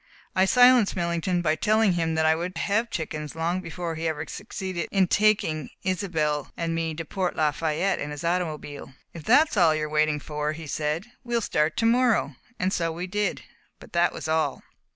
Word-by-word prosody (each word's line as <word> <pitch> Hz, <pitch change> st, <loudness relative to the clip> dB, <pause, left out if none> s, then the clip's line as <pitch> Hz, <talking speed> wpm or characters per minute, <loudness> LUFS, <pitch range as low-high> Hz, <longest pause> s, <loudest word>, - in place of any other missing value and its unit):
I 190 Hz, -, +4 dB
silenced 245 Hz, 0 st, +5 dB
Millington 175 Hz, 0 st, -1 dB
by 155 Hz, -2 st, +3 dB
telling 215 Hz, +3 st, +2 dB
him 165 Hz, -2 st, -1 dB
I 160 Hz, 0 st, +4 dB
would 175 Hz, +3 st, -4 dB
have 225 Hz, +4 st, 0 dB
chickens 155 Hz, -4 st, -5 dB
long 170 Hz, +3 st, -1 dB
before 170 Hz, -1 st, -5 dB
he 160 Hz, +1 st, -3 dB
ever 160 Hz, 0 st, -2 dB
succeeded 190 Hz, -5 st, -5 dB
in 190 Hz, -2 st, +3 dB
taking 185 Hz, -8 st, +2 dB
Isobel 160 Hz, -6 st, -1 dB
and 165 Hz, -1 st, -2 dB
me 165 Hz, -1 st, -2 dB
to 165 Hz, +1 st, -5 dB
Port 185 Hz, +3 st, -2 dB
Lafayette 160 Hz, +4 st, 0 dB
in 145 Hz, -, -4 dB
his 150 Hz, +1 st, -7 dB
automobile. 155 Hz, -6 st, -3 dB, 0.2 s
"If 160 Hz, -3 st, -10 dB
that 300 Hz, +7 st, +5 dB
is -, -, -4 dB
all 165 Hz, -4 st, +5 dB
you 155 Hz, -, -2 dB
are -, -, -6 dB
waiting 155 Hz, 0 st, +1 dB
for," 150 Hz, +1 st, -3 dB
he 160 Hz, +1 st, -8 dB
said, 150 Hz, +4 st, -2 dB, 0.2 s
"we 240 Hz, -1 st, -3 dB
will -, -, +3 dB
start 155 Hz, -7 st, 0 dB
to 225 Hz, -, +1 dB
morrow," 230 Hz, -, +2 dB, 0.2 s
and 185 Hz, +1 st, 0 dB
so 165 Hz, -1 st, 0 dB
we 170 Hz, +3 st, -4 dB
did; 205 Hz, +3 st, -2 dB, 0.4 s
but -, -, -15 dB
that 170 Hz, 0 st, +3 dB
was -, -, -6 dB
all. 160 Hz, 0 st, 0 dB
170 Hz, 195 wpm, -25 LUFS, 155-190 Hz, 0.4 s, silenced